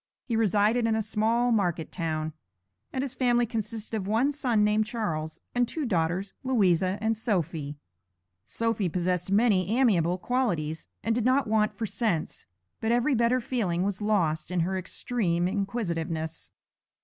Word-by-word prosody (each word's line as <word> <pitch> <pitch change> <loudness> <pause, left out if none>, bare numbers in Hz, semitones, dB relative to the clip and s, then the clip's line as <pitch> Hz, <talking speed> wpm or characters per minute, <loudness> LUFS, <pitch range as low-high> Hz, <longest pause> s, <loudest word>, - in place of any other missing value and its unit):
He 235 - -1
resided 220 +2 +3
in 225 - +2
a 220 - +1
small 225 +3 +1
market 180 -7 0
town, 155 -2 -2 0.6
and 260 - -2
his 270 -2 -3
family 240 -2 +2
consisted 225 0 -4
of 195 -3 -3
one 230 +7 +2
son 250 -7 +1
named 210 +1 +2
Charles, 160 -10 -3
and 245 0 +2
two 305 +4 -3
daughters, 180 -1 0
Louisa 190 -7 +2
and 220 +1 +1
Sophy. 165 -9 -2 0.7
Sophy 220 - -1
possessed 180 +1 -1
many 200 -4 +3
amiable 180 -9 +3
qualities, 175 -10 -1 0.2
and 225 - +1
did 235 0 0
not 260 +3 +3
want 215 -1 +1
for 225 - -1
sense, 210 -7 -2 0.3
but 225 - 0
every 245 +4 +2
better 235 +1 +3
feeling 205 -8 -1
was 200 0 -2
lost 170 -8 +1
in 180 -1 0
her 185 +3 0
extreme 180 -2 -1
inquisitiveness. 170 -6 -3
210 Hz, 150 wpm, -27 LUFS, 175-235 Hz, 0.7 s, resided